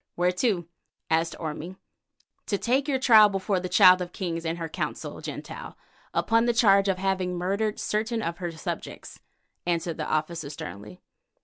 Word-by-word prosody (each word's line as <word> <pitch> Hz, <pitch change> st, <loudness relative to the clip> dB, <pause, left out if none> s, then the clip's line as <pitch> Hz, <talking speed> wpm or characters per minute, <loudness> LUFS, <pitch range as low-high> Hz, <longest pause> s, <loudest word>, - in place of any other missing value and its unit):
"Where 180 Hz, +1 st, +2 dB
to?" 180 Hz, -3 st, 0 dB, 0.4 s
asked 165 Hz, +1 st, +1 dB
Orme. 165 Hz, +3 st, -5 dB, 0.7 s
"To 200 Hz, -, 0 dB
take 265 Hz, +7 st, +1 dB
your 275 Hz, -2 st, +1 dB
trial 220 Hz, -5 st, +7 dB
before 195 Hz, -1 st, -1 dB
the 180 Hz, 0 st, -5 dB
Child 185 Hz, 0 st, +7 dB
of 175 Hz, 0 st, -5 dB
Kings 170 Hz, -3 st, -3 dB
and 165 Hz, +1 st, -2 dB
her 165 Hz, -1 st, -4 dB
Council, 160 Hz, -, -5 dB
Gentile, -, -, -7 dB, 0.3 s
upon 230 Hz, +1 st, +2 dB
the 240 Hz, -, +2 dB
charge 200 Hz, -4 st, +5 dB
of 190 Hz, -1 st, +1 dB
having 185 Hz, -1 st, -1 dB
murdered 200 Hz, +4 st, -1 dB
certain 220 Hz, +1 st, -1 dB
of 170 Hz, 0 st, -3 dB
her 175 Hz, -2 st, -3 dB
subjects," 160 Hz, -, -7 dB, 0.5 s
answered 170 Hz, -1 st, -1 dB
the 155 Hz, -, -3 dB
officer 155 Hz, -1 st, -2 dB
sternly. 105 Hz, -, -9 dB
180 Hz, 165 wpm, -26 LUFS, 165-210 Hz, 0.7 s, trial